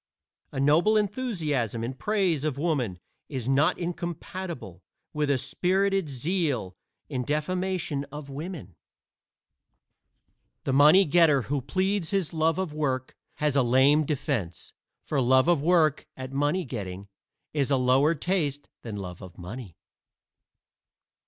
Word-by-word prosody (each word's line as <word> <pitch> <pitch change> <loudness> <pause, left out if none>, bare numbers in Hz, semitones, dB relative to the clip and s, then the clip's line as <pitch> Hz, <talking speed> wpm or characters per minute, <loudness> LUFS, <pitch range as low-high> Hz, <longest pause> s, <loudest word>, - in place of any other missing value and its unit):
A - - -4
noble 165 +10 +4
enthusiasm 165 - -1
in 120 +3 -3
praise 180 -1 0
of 150 -3 -1
Woman 140 - -1 0.3
is 130 -5 -4
not 135 +3 +3
incompatible 170 - -5 0.3
with 150 -1 0
a 140 - +3
spirited 185 +6 0
zeal 140 - -1 0.3
in 130 -4 -3
defamation 155 0 -1
of 145 0 -9
women. 140 - -7 1.9
The 135 - -1
money 150 +8 +7
getter 155 -4 +4
who 140 +2 -2
pleads 185 +6 0
his 195 -6 0
love 160 0 +1
of 185 -5 -2
work 130 -4 -2 0.2
has 150 -2 0
a 140 - +5
lame 130 +5 +4
defense, 135 - -3 0.3
for 140 -3 0
love 130 +2 +4
of 175 -5 +3
work 155 -2 +3
at 130 0 -7
money 145 +6 0
getting 100 -6 -6 0.5
is 140 -3 0
a 135 - +3
lower 130 +5 +3
taste 150 -4 -1
than 110 -3 -6
love 90 -2 -7
of 90 -3 -11
money. 95 +1 -8
145 Hz, 130 wpm, -27 LUFS, 130-170 Hz, 1.9 s, money